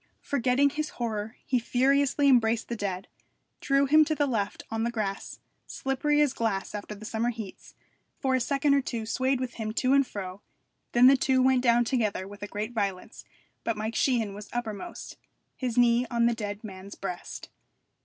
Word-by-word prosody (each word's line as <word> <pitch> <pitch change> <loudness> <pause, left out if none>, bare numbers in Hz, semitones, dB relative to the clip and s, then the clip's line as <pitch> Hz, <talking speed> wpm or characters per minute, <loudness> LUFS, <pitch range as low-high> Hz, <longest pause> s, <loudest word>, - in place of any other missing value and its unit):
Forgetting 275 +1 +2
his 305 +1 -3
horror 220 -1 -3
he 255 - +1
furiously 275 +4 +2
embraced 235 -3 +3
the 235 - -2
dead, 195 -2 -4 0.5
drew 275 0 +2
him 310 +3 +6
to 310 - -1
the 290 - +2
left 215 -7 -2
on 225 0 -1
the 235 - +1
grass, 210 -4 -4 0.3
slippery 295 +3 0
as 290 -3 +3
glass 220 -6 -2
after 210 0 -6
the 210 +2 -10
summer 225 +2 -1
heats, 220 -5 -8 0.4
for 265 -1 0
a 260 - +3
second 280 +3 +2
or 280 - +4
two 235 -4 -4
swayed 260 +3 0
with 255 -2 -3
him 215 0 -2
to 255 +2 +2
and 275 -2 +4
fro; 190 -1 -6 0.5
then 240 +1 +6
the 270 +2 +8
two 260 0 +2
went 260 -1 +4
down 240 -1 +4
together 215 -6 -1
with 205 0 -11
a 205 - -4
great 210 +3 -4
violence, 200 -4 -3 0.4
but 230 -2 -1
Mike 215 +1 -3
Sheehan 235 -7 +1
was 210 +1 -9
uppermost, 240 - -5 0.4
his 250 -2 -3
knee 240 0 +4
on 235 -1 +2
the 235 - +3
dead 205 -2 -5
man's 195 -1 -9
breast. 180 -2 -6
235 Hz, 185 wpm, -28 LUFS, 210-265 Hz, 0.5 s, the